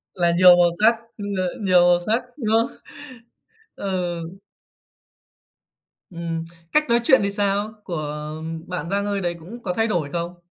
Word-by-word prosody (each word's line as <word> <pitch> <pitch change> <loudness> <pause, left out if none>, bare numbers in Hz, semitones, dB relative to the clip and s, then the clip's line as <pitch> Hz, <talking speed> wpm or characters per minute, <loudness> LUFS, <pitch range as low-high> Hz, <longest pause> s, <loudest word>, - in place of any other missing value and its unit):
Là 175 -2 +2
nhiều 180 -1 +8
màu 175 -1 +5
sắc, 225 +2 +6 0.2
ừ, 205 - -7 0.2
ờ, - - -4
nhiều 185 -3 +5
màu 175 0 +4
sắc, 220 +7 0
đúng 220 -5 +1
không? 230 +1 0 1.0
Ờ. 180 -3 -2 1.9
Ừm, 170 -2 -4 0.3
cách 300 -3 +2
nói 235 0 +4
chuyện 265 +1 +5
thì 200 - 0
sao? 205 +1 0
Của 160 -6 -4 0.6
bạn 180 -2 -4
Giang 200 +1 0
Ơi 200 -1 -1
đấy 175 -1 -2
cũng 225 +9 -11
có 180 - -2
thay 225 +4 +1
đổi 175 -9 -1
không? 175 +1 -4
185 Hz, 160 wpm, -22 LUFS, 175-215 Hz, 1.9 s, nhiều